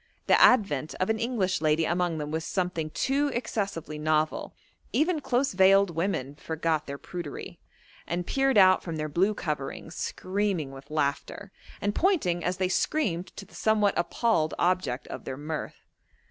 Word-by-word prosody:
The - - +4
advent 175 - +4
of 185 +4 0
an 220 - -1
English 225 -8 0
lady 155 +1 +2
among 175 0 0
them 150 -1 -4
was 160 +1 -2
something 175 -4 -2
too 275 - 0
excessively 195 - -3
novel: 155 0 0 0.4
even 320 +1 +2
close 270 -2 0
veiled 195 0 +5
women 165 -5 -2
forgot 160 0 -2
their 140 0 -5
prudery, 170 -1 -7 0.5
and 175 +1 -2
peered 270 +1 +2
out 185 -1 +6
from 165 -2 -5
their 155 0 -2
blue 190 +8 +2
coverings, 150 -1 -4
screaming 185 -6 -2
with 135 +1 -12
laughter, 150 +6 -2 0.3
and 205 0 0
pointing 210 - +1
as 180 +1 -1
they 185 -1 +1
screamed 185 - 0
to 200 - -7
the 195 - -22
somewhat 210 -2 +2
appalled 175 -2 +1
object 175 -8 0
of - - -8
their 130 - -5
mirth. 150 +2 -6
180 Hz, 160 wpm, -27 LUFS, 155-205 Hz, 0.5 s, out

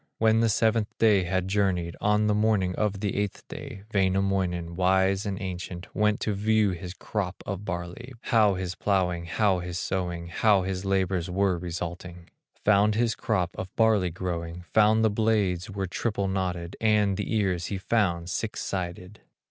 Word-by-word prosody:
When 110 0 +4
the 115 0 +3
seventh 110 0 +1
day 105 -5 +4
had 95 +1 -1
journeyed, 95 -4 0
On 105 +1 +3
the 105 - +2
morning 105 -4 +2
of 100 0 -1
the 100 -2 -1
eighth 100 -1 -3
day, 125 -9 -8
Wainamoinen, 95 -3 0
wise 95 +2 +2
and 95 -1 -3
ancient, 90 -2 -6
Went 105 0 +2
to 105 - 0
view 105 0 +2
his 90 +1 -6
crop 95 -3 -4
of 100 0 -5
barley, 90 +8 -5
How 110 -6 +3
his 90 -1 -3
plowing, 90 -4 0
how 95 +2 +1
his 90 0 -5
sowing, 90 -2 -3
How 100 +2 +3
his 95 0 -3
labors 95 -2 0
were 95 0 +1
resulting; 85 0 -6 0.3
Found 105 0 +4
his 115 0 +2
crop 95 -6 -1
of 95 - -5
barley 110 -5 +3
growing, 85 -1 -4
Found 110 +1 +5
the 110 - +3
blades 100 -5 +1
were 100 -1 -3
triple 100 +1 -2
knotted, 90 -2 -2
And 105 -3 +3
the 105 +3 -2
ears 95 -5 0
he 100 - -3
found 90 -4 0
six 110 +4 -3
sided. 90 +2 -5
95 Hz, 165 wpm, -27 LUFS, 90-105 Hz, 0.3 s, Found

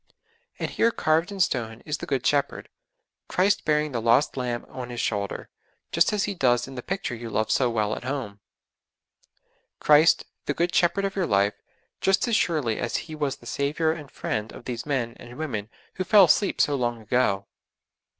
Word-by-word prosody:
And - - -3
here 230 - +3
carved 165 -3 +1
in 200 - -7
stone, 120 -10 0
is 150 -1 -3
the - - -6
Good 135 -2 -1
Shepherd, 140 -1 0 0.6
Christ 195 +2 +1
bearing 150 0 +1
the 120 -3 -2
lost 120 +6 +3
lamb 125 -2 -3
on 125 -2 -7
His 120 -1 -5
shoulder, 100 -2 -2 0.4
just 170 +5 +3
as 210 -1 0
He 205 - -1
does 120 -8 +2
in 135 - -9
the 125 - -5
picture 195 -3 -3
you 115 -1 -6
love 110 0 0
so 125 -2 +3
well 110 -2 0
at - - -8
home; 125 -7 -4 1.4
Christ, 150 +2 +5 0.2
the - - 0
Good 175 +1 0
Shepherd 190 +3 +2
of 195 - -3
your 190 -4 0
life, 100 +1 +2 0.5
just 195 +5 +2
as 235 - +2
surely 150 - +1
as 120 - -2
He 160 - -9
was 145 -3 -2
the - - -19
Saviour 150 +3 0
and 155 -4 -7
Friend 110 -1 -3
of - - -12
these 120 +2 -5
men 125 -5 -1
and 120 +1 -11
women 110 -10 -4 0.2
who 185 - -2
fell 200 +2 +7
asleep 195 +4 +2
so 145 - +3
long 120 -3 -1
ago! 110 -3 +1
135 Hz, 190 wpm, -25 LUFS, 120-165 Hz, 1.4 s, fell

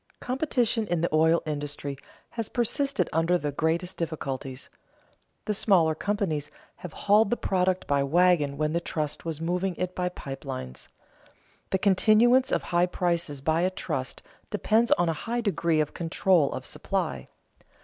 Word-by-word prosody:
Competition 245 -4 0
in 175 -4 0
the 170 - -1
oil 160 +2 +4
industry 145 -2 -4 0.4
has 230 -3 -4
persisted 275 +4 0
under 165 +2 +2
the 150 -4 -3
greatest 170 +5 -1
difficulties. 135 -5 -4 0.8
The 210 - 0
smaller 180 -6 +3
companies 160 -5 -2 0.3
have 180 - -8
hauled 205 +1 +5
the 240 - 0
product 185 -1 0
by 140 -1 +1
wagon 150 -1 +3
when 155 +1 0
the 170 - 0
trust 155 -3 -4
was 160 -2 -3
moving 180 +3 -1
it 180 +1 -3
by 180 0 -1
pipe 135 -6 -8
lines. 65 -1 -7 0.8
The 190 - +1
continuance 220 +6 +4
of - - +1
high 175 +1 +2
prices 170 -6 -1
by 160 +4 +1
a 185 - +2
trust 185 - -4 0.3
depends 225 +2 +2
on 175 - +1
a 165 - +1
high 235 +9 -3
degree 170 -7 +1
of 150 -1 0
control 170 -2 +2
of - - -6
supply. - - -2
175 Hz, 155 wpm, -27 LUFS, 155-200 Hz, 0.8 s, hauled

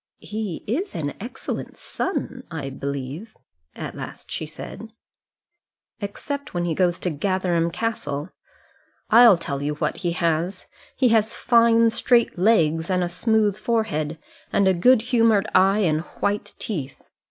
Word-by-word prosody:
"He 210 -5 -5
is 280 - -2
an 145 -4 -2
excellent 235 +6 -6
son, 255 - -3
I 145 -5 -5
believe," 140 - -6 0.4
at - - -6
last - - -9
she 155 - -4
said. 220 +7 -9 1.1
"Except 270 +6 -5
when 175 0 0
he 170 - 0
goes 175 0 +1
to 180 - -1
Gatherum 175 +1 0
Castle. 170 -6 -3 0.8
I'll 230 -3 +8
tell 140 -4 -4
you 150 +1 -2
what 150 0 -2
he 175 -2 -2
has: 170 +2 -1 0.3
he 255 -2 +3
has 220 -1 +2
fine 230 -1 +4
straight 235 -3 +2
legs, 165 -5 +3
and 180 -1 +1
a 175 - -1
smooth 210 +2 +1
forehead, 165 -11 -1 0.3
and 200 - +3
a 190 - +5
good 225 +6 +4
humoured 230 -4 +3
eye, 195 +3 +4
and 155 -5 +2 0.2
white 205 +1 -1
teeth. 150 - -5
190 Hz, 140 wpm, -23 LUFS, 165-225 Hz, 1.1 s, I'll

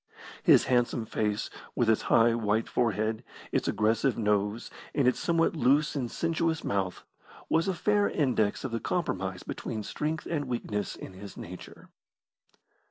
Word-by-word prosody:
His - - +6
handsome 120 -2 +1
face, 105 -1 -1 0.2
with 120 - +2
its 110 -1 +3
high, 115 0 +5
white 110 -1 0
forehead, 110 -1 0 0.3
its - - 0
aggressive 110 +4 +2
nose, 105 +1 0 0.2
and 140 -4 +3
its 125 - +2
somewhat 165 -1 +2
loose 145 +3 +3
and 125 -4 -2
sensuous 165 +1 -1
mouth, 95 -2 -2 0.5
was 165 +3 +2
a 190 - 0
fair 205 +2 +2
index 120 -9 +1
of 130 - -3
the 115 - -1
compromise 95 - -2
between 110 -1 -5
strength 155 +8 -3
and 150 -4 -2
weakness 105 -5 -3
in - - -9
his 100 +1 -10
nature. 90 +2 -10
115 Hz, 150 wpm, -29 LUFS, 105-150 Hz, 0.5 s, His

